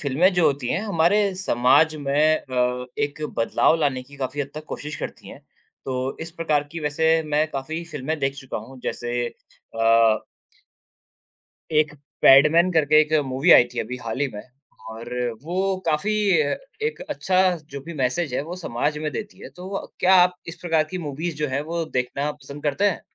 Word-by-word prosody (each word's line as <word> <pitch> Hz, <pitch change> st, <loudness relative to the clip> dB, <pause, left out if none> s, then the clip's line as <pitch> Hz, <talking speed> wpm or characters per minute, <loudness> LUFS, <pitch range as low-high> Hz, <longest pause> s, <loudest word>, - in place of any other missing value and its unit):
फिल्में 150 Hz, +7 st, +2 dB
जो 175 Hz, -2 st, +3 dB
होती 140 Hz, -3 st, 0 dB
हैं, 180 Hz, -, 0 dB
हमारे 200 Hz, +1 st, +2 dB
समाज 155 Hz, -2 st, +3 dB
में 150 Hz, +2 st, +2 dB
अ, 125 Hz, -1 st, -1 dB
एक 145 Hz, +1 st, -2 dB, 0.2 s
बदलाव 115 Hz, +7 st, +3 dB
लाने 130 Hz, -4 st, 0 dB
की 140 Hz, +2 st, -16 dB
काफ़ी 135 Hz, +1 st, -3 dB
हद 140 Hz, -1 st, -4 dB
तक 155 Hz, 0 st, -7 dB
कोशिश 150 Hz, 0 st, -6 dB
करती -, -, -7 dB
हैं। -, -, -11 dB, 0.4 s
तो 130 Hz, 0 st, -3 dB
इस 160 Hz, +1 st, -6 dB
प्रकार 155 Hz, -3 st, 0 dB
की 165 Hz, -, -5 dB
वैसे 160 Hz, +2 st, +2 dB
मैं 150 Hz, +1 st, +1 dB
काफ़ी 155 Hz, +5 st, -4 dB
फिल्में 150 Hz, +2 st, -3 dB
देख 135 Hz, -1 st, -1 dB
चुका 135 Hz, -2 st, -6 dB
हूँ। 125 Hz, +5 st, -11 dB
जैसे 120 Hz, 0 st, -3 dB
अ 115 Hz, -1 st, +1 dB, 1.5 s
एक 150 Hz, -1 st, +2 dB, 0.3 s
पैडमैन 160 Hz, +6 st, +7 dB
करके 155 Hz, -2 st, +5 dB
एक 155 Hz, 0 st, 0 dB
मूवी 130 Hz, +1 st, +1 dB
आई -, -, +8 dB
थी 125 Hz, -, -7 dB
अभी 125 Hz, +3 st, -5 dB
हाल 115 Hz, +3 st, -4 dB
ही 145 Hz, -, +2 dB
में, 105 Hz, -, -6 dB, 0.5 s
और 115 Hz, +2 st, -8 dB, 0.3 s
वो 190 Hz, +4 st, -1 dB
काफ़ी 160 Hz, +7 st, +1 dB, 0.7 s
एक 460 Hz, -, -4 dB
अच्छा 185 Hz, -1 st, 0 dB, 0.3 s
जो 140 Hz, -, -6 dB
भी 170 Hz, -, -6 dB
मैसेज 135 Hz, +1 st, -1 dB
है -, -, 0 dB
वो 170 Hz, +4 st, -7 dB
समाज 150 Hz, -2 st, -2 dB
में 155 Hz, 0 st, -3 dB
देती 210 Hz, -1 st, -6 dB
है। -, -, -8 dB
तो 190 Hz, +2 st, -5 dB
क्या 185 Hz, +1 st, +5 dB
आप 180 Hz, -1 st, +5 dB
इस 170 Hz, -, -7 dB
प्रकार 165 Hz, -3 st, +1 dB
की 185 Hz, -, -4 dB
मूवीज़ 155 Hz, +1 st, -4 dB
जो 150 Hz, 0 st, -1 dB
है 130 Hz, +2 st, -1 dB
वो 165 Hz, +2 st, -3 dB
देखना 140 Hz, +1 st, -2 dB
पसंद 145 Hz, 0 st, -11 dB
करते 150 Hz, +7 st, 0 dB
हैं? 180 Hz, -, -5 dB
150 Hz, 180 wpm, -23 LUFS, 130-165 Hz, 1.5 s, आई